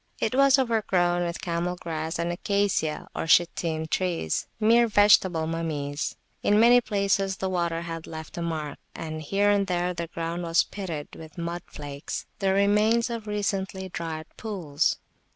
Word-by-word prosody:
It -, -, 0 dB
was 275 Hz, +1 st, +6 dB
overgrown 190 Hz, -8 st, +1 dB
with 170 Hz, 0 st, -3 dB
camel 175 Hz, +1 st, -1 dB
grass 160 Hz, -1 st, -4 dB
and 170 Hz, +1 st, -1 dB
Acacia 200 Hz, -4 st, 0 dB, 0.2 s
(Shittim) 165 Hz, -1 st, +2 dB
trees, 170 Hz, -, -1 dB
mere 235 Hz, +2 st, +5 dB
vegetable 195 Hz, -6 st, +4 dB
mummies; 150 Hz, -3 st, -3 dB, 0.3 s
in 210 Hz, +1 st, +3 dB
many 240 Hz, +2 st, +7 dB
places 200 Hz, -3 st, 0 dB
the 190 Hz, 0 st, -2 dB
water 170 Hz, -2 st, 0 dB
had 165 Hz, -1 st, -6 dB
left 160 Hz, -1 st, -8 dB
a 170 Hz, -, -4 dB
mark; 155 Hz, -3 st, -3 dB, 0.2 s
and 155 Hz, -1 st, -5 dB
here 200 Hz, +6 st, +2 dB
and 200 Hz, -1 st, +2 dB
there 180 Hz, 0 st, 0 dB
the 170 Hz, -1 st, -4 dB
ground 170 Hz, +1 st, -4 dB
was 165 Hz, -1 st, +3 dB
pitted 170 Hz, -7 st, -6 dB
with 160 Hz, 0 st, -12 dB
mud 170 Hz, +1 st, -3 dB
flakes, 145 Hz, -1 st, -6 dB
the 195 Hz, -2 st, +2 dB
remains 210 Hz, +4 st, +3 dB
of 230 Hz, -2 st, -5 dB
recently 195 Hz, -2 st, -2 dB
dried 160 Hz, -2 st, -5 dB
pools. 170 Hz, -9 st, -1 dB
175 Hz, 150 wpm, -26 LUFS, 165-205 Hz, 0.3 s, many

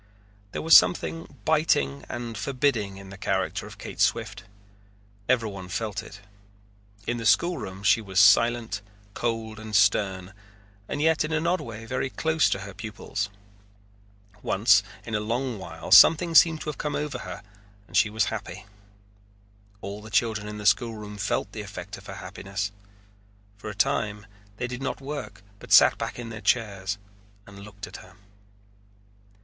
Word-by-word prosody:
There -, -, -4 dB
was 160 Hz, 0 st, +7 dB
something 165 Hz, -1 st, +3 dB
biting 70 Hz, -, +1 dB
and 120 Hz, -1 st, -5 dB
forbidding 115 Hz, -3 st, -1 dB
in 95 Hz, -1 st, -11 dB
the 100 Hz, -, -11 dB
character -, -, -1 dB
of -, -, -12 dB
Kate -, -, -9 dB
Swift. -, -, 0 dB, 0.8 s
Everyone 105 Hz, -7 st, 0 dB
felt 105 Hz, +1 st, -3 dB
it. 100 Hz, +1 st, -12 dB, 0.8 s
In 120 Hz, -, -1 dB
the 115 Hz, -, -5 dB
schoolroom 100 Hz, -, +1 dB
she 100 Hz, +3 st, +4 dB
was 95 Hz, -3 st, -1 dB
silent, 115 Hz, +1 st, +4 dB, 0.3 s
cold, 115 Hz, -1 st, -3 dB
and 110 Hz, -1 st, -6 dB
stern, 95 Hz, -1 st, +2 dB, 0.6 s
and 145 Hz, -, -2 dB
yet 160 Hz, 0 st, +3 dB
in 155 Hz, -, -4 dB
an 160 Hz, +1 st, 0 dB
odd 180 Hz, +2 st, +1 dB
way 115 Hz, -1 st, -8 dB
very 130 Hz, +2 st, -2 dB
close 160 Hz, +3 st, +1 dB
to 95 Hz, -, -1 dB
her 100 Hz, 0 st, -8 dB
pupils. 105 Hz, 0 st, -4 dB, 1.1 s
Once -, -, +4 dB, 0.2 s
in 115 Hz, -, -7 dB
a 105 Hz, -, +1 dB
long 120 Hz, +2 st, -2 dB
while 80 Hz, -2 st, -8 dB
something 165 Hz, -, +8 dB
seemed 160 Hz, -1 st, +6 dB
to -, -, -4 dB
have 150 Hz, -, -6 dB
come 150 Hz, -1 st, -2 dB
over 145 Hz, -3 st, -3 dB
her -, -, -8 dB, 0.4 s
and -, -, -13 dB
she 110 Hz, -, +4 dB
was 110 Hz, 0 st, +1 dB
happy. 100 Hz, -, -7 dB, 1.2 s
All 100 Hz, +1 st, -6 dB
of 105 Hz, -, -14 dB
the -, -, -9 dB
children 110 Hz, -1 st, 0 dB
in 105 Hz, 0 st, -6 dB
the 105 Hz, -, -7 dB
schoolroom 105 Hz, -1 st, 0 dB
felt 105 Hz, 0 st, -1 dB
the 110 Hz, -, -6 dB
effect 100 Hz, -1 st, -8 dB
of 95 Hz, -, -16 dB
her -, -, -7 dB
happiness. 100 Hz, +1 st, -5 dB, 0.8 s
For 100 Hz, -, -8 dB
a 100 Hz, -, -7 dB
time 105 Hz, 0 st, 0 dB, 0.3 s
they -, -, -2 dB
did 125 Hz, +1 st, -6 dB
not 135 Hz, -, -3 dB
work 135 Hz, -8 st, -7 dB, 0.2 s
but -, -, -13 dB
sat -, -, +7 dB
back -, -, -4 dB
in 120 Hz, -2 st, -6 dB
their 110 Hz, 0 st, -8 dB
chairs 100 Hz, -3 st, 0 dB, 0.5 s
and 100 Hz, 0 st, -13 dB
looked 100 Hz, 0 st, -9 dB
at -, -, -10 dB
her. 95 Hz, 0 st, -15 dB
110 Hz, 165 wpm, -26 LUFS, 100-125 Hz, 1.2 s, something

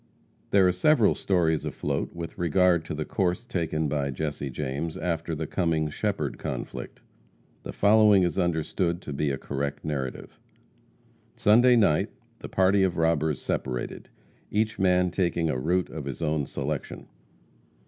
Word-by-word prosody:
There 95 Hz, -2 st, +5 dB
are -, -, +4 dB
several 110 Hz, +5 st, +4 dB
stories 80 Hz, -5 st, +1 dB
afloat -, -, -3 dB
with 85 Hz, +2 st, -7 dB
regard 85 Hz, 0 st, +3 dB
to 80 Hz, -, -4 dB
the 75 Hz, 0 st, -3 dB
course 95 Hz, +4 st, -1 dB
taken 80 Hz, -8 st, -1 dB
by 70 Hz, -1 st, -1 dB
Jesse 70 Hz, 0 st, -3 dB
James 70 Hz, +4 st, -4 dB
after 85 Hz, -1 st, -2 dB
the 80 Hz, +1 st, -3 dB
Cummings 80 Hz, -3 st, -1 dB
Shepherd -, -, -2 dB
conflict. -, -, -6 dB, 0.6 s
The -, -, -7 dB
following 105 Hz, -2 st, +5 dB
is 85 Hz, +1 st, 0 dB
understood 85 Hz, 0 st, 0 dB
to 75 Hz, -, -6 dB
be 70 Hz, +1 st, 0 dB
a 70 Hz, -, -1 dB
correct 70 Hz, +2 st, -4 dB
narrative. 70 Hz, -4 st, -5 dB, 1.0 s
Sunday 120 Hz, +4 st, +5 dB
night 100 Hz, -10 st, +3 dB, 0.3 s
the -, -, -8 dB
party 95 Hz, +1 st, +3 dB
of 95 Hz, -2 st, +1 dB
robbers 80 Hz, -3 st, +1 dB
separated, 60 Hz, -2 st, -4 dB, 0.4 s
each 110 Hz, +1 st, -1 dB
man 90 Hz, -1 st, +3 dB
taking 85 Hz, -3 st, 0 dB
a 65 Hz, -, -2 dB
route 85 Hz, +3 st, 0 dB
of 75 Hz, -3 st, -6 dB
his 70 Hz, +4 st, -5 dB
own 75 Hz, -2 st, 0 dB
selection. 70 Hz, +1 st, -4 dB
80 Hz, 150 wpm, -26 LUFS, 75-95 Hz, 1.0 s, There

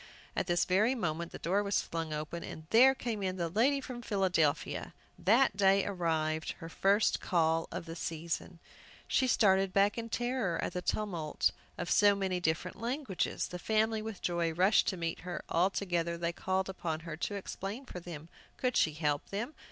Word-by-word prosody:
at -, -, -1 dB
this 175 Hz, -1 st, +2 dB
very 210 Hz, +7 st, +3 dB
moment 170 Hz, -6 st, -2 dB
the -, -, -7 dB
door 190 Hz, +4 st, +1 dB
was 200 Hz, -1 st, +1 dB
flung 165 Hz, -1 st, -4 dB
open, 155 Hz, +3 st, -4 dB
and 160 Hz, -, -8 dB
there 260 Hz, +4 st, +7 dB
came 230 Hz, -5 st, -3 dB
in 185 Hz, -1 st, -2 dB
the 170 Hz, -2 st, -1 dB
lady 250 Hz, -, +3 dB
from 250 Hz, -2 st, -7 dB
Philadelphia, 185 Hz, -9 st, 0 dB, 0.2 s
that 225 Hz, +2 st, +4 dB
day 195 Hz, 0 st, +4 dB
arrived, 160 Hz, -4 st, -1 dB
her 165 Hz, -, -9 dB
first 200 Hz, +5 st, +2 dB
call 165 Hz, -2 st, +1 dB
of -, -, -5 dB
the 165 Hz, 0 st, -7 dB
season! 165 Hz, +1 st, -4 dB, 0.5 s
She 260 Hz, -, +2 dB
started 195 Hz, -5 st, +4 dB
back 200 Hz, +3 st, +3 dB
in 230 Hz, 0 st, -5 dB
terror 240 Hz, -7 st, -1 dB
at -, -, -2 dB
the 180 Hz, -, -2 dB
tumult 175 Hz, -7 st, 0 dB, 0.3 s
of 175 Hz, -, -3 dB
so 205 Hz, -1 st, +6 dB
many 190 Hz, -2 st, -1 dB
different 175 Hz, +3 st, -2 dB
languages! 245 Hz, -4 st, -2 dB
The 180 Hz, -, -6 dB
family, 220 Hz, +2 st, +1 dB
with 220 Hz, -2 st, -7 dB
joy, 170 Hz, -1 st, 0 dB
rushed 185 Hz, +8 st, +4 dB
to 195 Hz, -5 st, 0 dB
meet 165 Hz, -1 st, -3 dB
her. 180 Hz, 0 st, -5 dB
All 175 Hz, +3 st, +3 dB
together 170 Hz, -4 st, -1 dB
they 170 Hz, 0 st, -1 dB
called 190 Hz, +2 st, -1 dB
upon 165 Hz, -4 st, -3 dB
her 165 Hz, -1 st, -6 dB
to 205 Hz, +4 st, -3 dB
explain 200 Hz, +5 st, -5 dB
for 180 Hz, -, -7 dB
them. 165 Hz, -3 st, -8 dB, 0.3 s
Could 255 Hz, -2 st, 0 dB
she 155 Hz, -, +3 dB
help 150 Hz, -1 st, -1 dB
them? 225 Hz, +9 st, -3 dB
185 Hz, 185 wpm, -32 LUFS, 165-210 Hz, 0.5 s, there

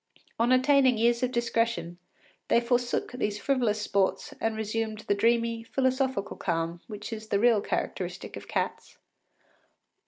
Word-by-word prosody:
On 235 Hz, +2 st, +3 dB
attaining 260 Hz, -1 st, +4 dB
years 235 Hz, +1 st, +2 dB
of 255 Hz, -1 st, 0 dB
discretion, 230 Hz, -7 st, -1 dB, 0.5 s
they -, -, +4 dB
forsook 240 Hz, 0 st, 0 dB
these 210 Hz, -4 st, -2 dB
frivolous 235 Hz, -3 st, +1 dB
sports 195 Hz, -2 st, 0 dB
and 225 Hz, 0 st, 0 dB
resumed 220 Hz, 0 st, -2 dB
the -, -, 0 dB
dreamy, 230 Hz, +2 st, +1 dB
philosophical 260 Hz, -3 st, -1 dB
calm 170 Hz, -1 st, -2 dB
which 210 Hz, +1 st, -7 dB
is 220 Hz, 0 st, -7 dB
the 200 Hz, -, +1 dB
real 225 Hz, 0 st, +4 dB
characteristic -, -, -4 dB
of -, -, -9 dB
cats. -, -, -3 dB
230 Hz, 135 wpm, -28 LUFS, 210-245 Hz, 0.5 s, attaining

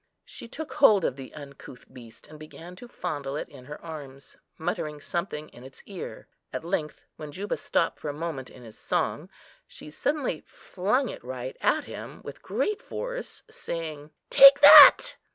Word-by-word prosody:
She -, -, -11 dB
took 310 Hz, +6 st, -8 dB
hold 210 Hz, -, +4 dB
of -, -, -1 dB
the 135 Hz, -1 st, -10 dB
uncouth 140 Hz, -4 st, -12 dB
beast 115 Hz, -3 st, -15 dB
and 155 Hz, 0 st, -14 dB
began 165 Hz, +3 st, -12 dB
to 245 Hz, -, -12 dB
fondle 145 Hz, -, -5 dB
it -, -, -5 dB
in 125 Hz, -, -14 dB
her 150 Hz, +2 st, -9 dB
arms, 140 Hz, -4 st, -10 dB, 0.2 s
muttering 150 Hz, -1 st, -4 dB
something 155 Hz, -1 st, -5 dB
in 120 Hz, -, -16 dB
its 130 Hz, +1 st, -15 dB
ear. 195 Hz, -4 st, -9 dB, 0.2 s
At -, -, -5 dB
length, 165 Hz, -4 st, -4 dB
when 150 Hz, -1 st, -9 dB
Juba 200 Hz, +7 st, -4 dB
stopped 165 Hz, -, -2 dB
for 150 Hz, -, -5 dB
a -, -, -4 dB
moment 150 Hz, -4 st, -6 dB
in 125 Hz, -, -15 dB
his 110 Hz, -2 st, -13 dB
song, -, -, -2 dB, 0.4 s
she 150 Hz, -, -12 dB
suddenly 280 Hz, -, -2 dB
flung 210 Hz, +9 st, -2 dB
it -, -, -9 dB
right 130 Hz, +1 st, -7 dB
at 310 Hz, -, +1 dB
him, -, -, -10 dB
with -, -, -10 dB
great 420 Hz, -1 st, -2 dB
force, -, -, -7 dB
saying, 155 Hz, -3 st, -7 dB, 0.2 s
"Take 275 Hz, 0 st, +9 dB
that!" -, -, +9 dB
155 Hz, 170 wpm, -26 LUFS, 140-195 Hz, 0.4 s, Take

